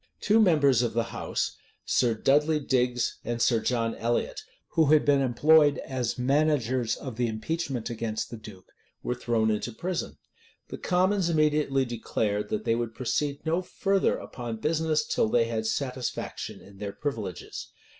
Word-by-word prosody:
Two 215 Hz, +2 st, +3 dB
members 145 Hz, -, +4 dB
of 120 Hz, -, -1 dB
the 115 Hz, +1 st, +1 dB
house, -, -, -2 dB, 0.3 s
Sir 120 Hz, -3 st, +2 dB
Dudley 150 Hz, +6 st, +3 dB
Digges 125 Hz, -3 st, 0 dB
and 120 Hz, 0 st, -3 dB
Sir 115 Hz, -1 st, +3 dB
John 115 Hz, -1 st, 0 dB
Elliot, 120 Hz, +1 st, -1 dB, 0.3 s
who 160 Hz, -2 st, +3 dB
had 155 Hz, +1 st, +5 dB
been 140 Hz, -1 st, +4 dB
employed 145 Hz, +4 st, +4 dB
as 125 Hz, -3 st, -3 dB
managers 130 Hz, -3 st, +1 dB
of 130 Hz, -5 st, -8 dB
the 120 Hz, -1 st, +1 dB
impeachment 125 Hz, +2 st, -3 dB
against 115 Hz, -1 st, -3 dB
the 115 Hz, -, -6 dB
duke, 105 Hz, -4 st, -13 dB, 0.3 s
were -, -, -1 dB
thrown 115 Hz, -3 st, +1 dB
into 105 Hz, +3 st, -2 dB
prison.[] 175 Hz, +10 st, -4 dB, 0.5 s
The -, -, -7 dB
commons 185 Hz, 0 st, +2 dB
immediately 150 Hz, -4 st, +2 dB
declared, 105 Hz, -3 st, -2 dB
that 110 Hz, +1 st, -2 dB
they 115 Hz, -, +3 dB
would 115 Hz, -1 st, -2 dB
proceed 140 Hz, +4 st, -2 dB
no 165 Hz, +3 st, +1 dB
further 195 Hz, +1 st, +1 dB
upon 120 Hz, -2 st, -6 dB
business 155 Hz, +3 st, 0 dB
till 110 Hz, -, +1 dB
they 115 Hz, +1 st, +3 dB
had 110 Hz, -1 st, -2 dB
satisfaction 130 Hz, +1 st, -3 dB
in 100 Hz, 0 st, -16 dB
their 100 Hz, -1 st, -4 dB
privileges. 110 Hz, -, -5 dB
125 Hz, 155 wpm, -27 LUFS, 115-150 Hz, 0.5 s, had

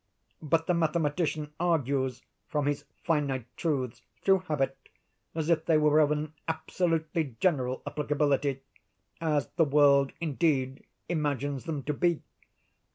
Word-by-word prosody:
But 160 Hz, +1 st, +1 dB
the 180 Hz, -, +2 dB
mathematician 155 Hz, -2 st, 0 dB
argues, 140 Hz, -7 st, 0 dB, 0.2 s
from 150 Hz, -3 st, -1 dB
his 145 Hz, 0 st, -1 dB, 0.2 s
finite 140 Hz, -7 st, 0 dB
truths, 130 Hz, -7 st, -2 dB, 0.2 s
through 195 Hz, -1 st, +5 dB
habit, 135 Hz, -3 st, 0 dB, 0.6 s
as 160 Hz, -2 st, -1 dB
if 165 Hz, -2 st, +2 dB
they 160 Hz, -, +5 dB
were 150 Hz, 0 st, +4 dB
of 150 Hz, -2 st, +5 dB
an 150 Hz, 0 st, -2 dB
absolutely 160 Hz, -3 st, -1 dB
general 130 Hz, -8 st, +1 dB
applicability—as 145 Hz, +1 st, -2 dB
the 165 Hz, -, +6 dB
world 140 Hz, -1 st, +4 dB
indeed 140 Hz, -4 st, 0 dB, 0.2 s
imagines 145 Hz, -4 st, -1 dB
them 155 Hz, -5 st, -3 dB
to 150 Hz, -, -1 dB
be. 170 Hz, +2 st, +1 dB
150 Hz, 120 wpm, -29 LUFS, 140-160 Hz, 0.6 s, the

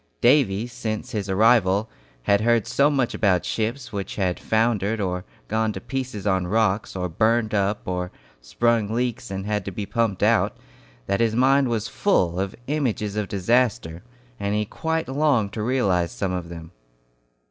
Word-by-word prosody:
Davy, 120 Hz, -5 st, +3 dB
since 115 Hz, 0 st, -5 dB
his 105 Hz, -4 st, -3 dB
arrival, 105 Hz, 0 st, +3 dB, 0.4 s
had 100 Hz, +9 st, +3 dB
heard 115 Hz, -1 st, +3 dB
so 140 Hz, +1 st, +3 dB
much 135 Hz, -5 st, 0 dB
about 95 Hz, -4 st, +2 dB
ships 120 Hz, +3 st, -3 dB
which 100 Hz, -1 st, -4 dB
had 90 Hz, -3 st, -1 dB
foundered, 110 Hz, -1 st, +1 dB
or 90 Hz, -2 st, -2 dB, 0.2 s
gone 110 Hz, 0 st, 0 dB
to 95 Hz, -, -5 dB
pieces 130 Hz, -3 st, -5 dB
on 95 Hz, -3 st, +1 dB
rocks, 105 Hz, 0 st, +1 dB
or 90 Hz, -1 st, -2 dB
burned 110 Hz, +5 st, +1 dB
up, 100 Hz, 0 st, +1 dB
or 90 Hz, 0 st, -3 dB, 0.3 s
sprung 115 Hz, -, +1 dB
leaks 125 Hz, +1 st, -2 dB
and 95 Hz, 0 st, -4 dB
had 105 Hz, -1 st, -1 dB
to 100 Hz, -, -5 dB
be 100 Hz, +2 st, -4 dB
pumped 115 Hz, -4 st, -1 dB
out, -, -, +2 dB, 0.5 s
that 100 Hz, -, 0 dB
his 115 Hz, -1 st, +2 dB
mind 135 Hz, +2 st, +4 dB
was 115 Hz, -2 st, -1 dB
full 90 Hz, -, +1 dB
of 95 Hz, 0 st, -2 dB
images 125 Hz, -8 st, -1 dB
of 105 Hz, -1 st, -1 dB
disaster, 100 Hz, -5 st, 0 dB, 0.4 s
and 100 Hz, 0 st, -1 dB
he 105 Hz, 0 st, 0 dB
quite 160 Hz, +8 st, -2 dB
longed 130 Hz, -7 st, +1 dB
to 110 Hz, -, -3 dB
realize 100 Hz, -8 st, +1 dB
some 75 Hz, +10 st, -2 dB
of 90 Hz, -2 st, -4 dB
them. 85 Hz, -1 st, -9 dB
105 Hz, 170 wpm, -23 LUFS, 95-120 Hz, 0.5 s, mind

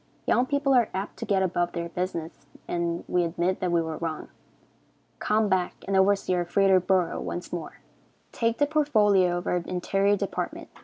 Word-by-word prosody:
Young 250 Hz, +1 st, +2 dB
people 280 Hz, 0 st, +1 dB
are 240 Hz, -4 st, +4 dB
apt 195 Hz, +2 st, -4 dB
to -, -, -5 dB
get 195 Hz, -2 st, +2 dB
above 175 Hz, -1 st, 0 dB
their 170 Hz, -1 st, -3 dB
business, 165 Hz, -4 st, -5 dB, 0.2 s
and 170 Hz, -1 st, -2 dB
we 180 Hz, -, +1 dB
admit 170 Hz, +2 st, -1 dB
that 180 Hz, -1 st, -1 dB
we 170 Hz, -1 st, +2 dB
were 160 Hz, -1 st, -4 dB
wrong. 160 Hz, -1 st, -4 dB, 0.9 s
Come 215 Hz, 0 st, +1 dB
back 185 Hz, -2 st, 0 dB
and 195 Hz, -, 0 dB
oversee 190 Hz, 0 st, +3 dB
our 175 Hz, -1 st, +1 dB
fritter 190 Hz, +1 st, +3 dB
bureau 185 Hz, -1 st, 0 dB
once 175 Hz, 0 st, -5 dB
more. 170 Hz, -3 st, -6 dB, 0.5 s
Take 230 Hz, 0 st, 0 dB
the 290 Hz, -, +3 dB
portfolio 210 Hz, -, +3 dB
of 175 Hz, -, -5 dB
our 180 Hz, -, +1 dB
interior 195 Hz, +3 st, 0 dB
department. 200 Hz, 0 st, -4 dB
185 Hz, 175 wpm, -26 LUFS, 175-205 Hz, 0.9 s, are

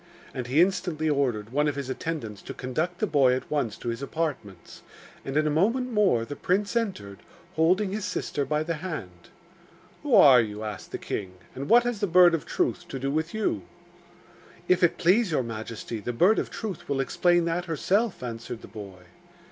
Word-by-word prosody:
And 125 Hz, -3 st, -4 dB
he 140 Hz, +6 st, +4 dB
instantly 175 Hz, -5 st, -1 dB
ordered 120 Hz, -7 st, -1 dB
one 150 Hz, +3 st, +1 dB
of 145 Hz, -, -1 dB
his 140 Hz, -2 st, -4 dB
attendants 130 Hz, -6 st, -4 dB
to -, -, -8 dB
conduct 155 Hz, +8 st, -2 dB
the 215 Hz, -, 0 dB
boy 140 Hz, -8 st, +3 dB
at 130 Hz, -, -6 dB
once 135 Hz, -8 st, -1 dB
to 120 Hz, -, -5 dB
his 115 Hz, +2 st, -4 dB
apartments; 140 Hz, -, -5 dB, 0.4 s
and 135 Hz, +2 st, -3 dB
in 155 Hz, -, +3 dB
a 150 Hz, -, +1 dB
moment 230 Hz, -, +1 dB
more 190 Hz, -, +3 dB
the 145 Hz, -, -6 dB
prince 200 Hz, +7 st, 0 dB
entered, 145 Hz, -, -2 dB, 0.3 s
holding 185 Hz, +5 st, +2 dB
his 210 Hz, +1 st, -3 dB
sister 180 Hz, -5 st, -2 dB
by 150 Hz, +2 st, 0 dB
the 165 Hz, +1 st, -2 dB
hand. 145 Hz, -, -7 dB, 0.7 s
'Who 285 Hz, -5 st, +2 dB
are 135 Hz, -, +8 dB
you?' 105 Hz, -1 st, -5 dB
asked 105 Hz, -3 st, -7 dB
the -, -, -3 dB
king; 95 Hz, -3 st, -5 dB, 0.2 s
'and 140 Hz, +2 st, -6 dB
what 240 Hz, +1 st, +7 dB
has 240 Hz, -3 st, -2 dB
the 205 Hz, -, 0 dB
Bird 175 Hz, 0 st, +6 dB
of 165 Hz, -, -2 dB
Truth 255 Hz, -, -1 dB
to 135 Hz, -, -5 dB
do 135 Hz, +1 st, -2 dB
with 160 Hz, +5 st, -2 dB
you?' 210 Hz, -, 0 dB, 1.1 s
'If 180 Hz, 0 st, +3 dB
it 175 Hz, -2 st, +3 dB
please 185 Hz, +5 st, +3 dB
your 150 Hz, -5 st, +1 dB
majesty, 115 Hz, 0 st, -6 dB
the 120 Hz, +4 st, -4 dB
Bird 185 Hz, -, +4 dB
of -, -, -3 dB
Truth 205 Hz, -10 st, -6 dB
will 140 Hz, -1 st, 0 dB
explain 175 Hz, +5 st, +2 dB
that 170 Hz, +1 st, -1 dB
herself,' 185 Hz, -, 0 dB
answered 115 Hz, -1 st, -6 dB
the -, -, -9 dB
boy. 100 Hz, -4 st, -10 dB
155 Hz, 195 wpm, -26 LUFS, 120-180 Hz, 1.1 s, are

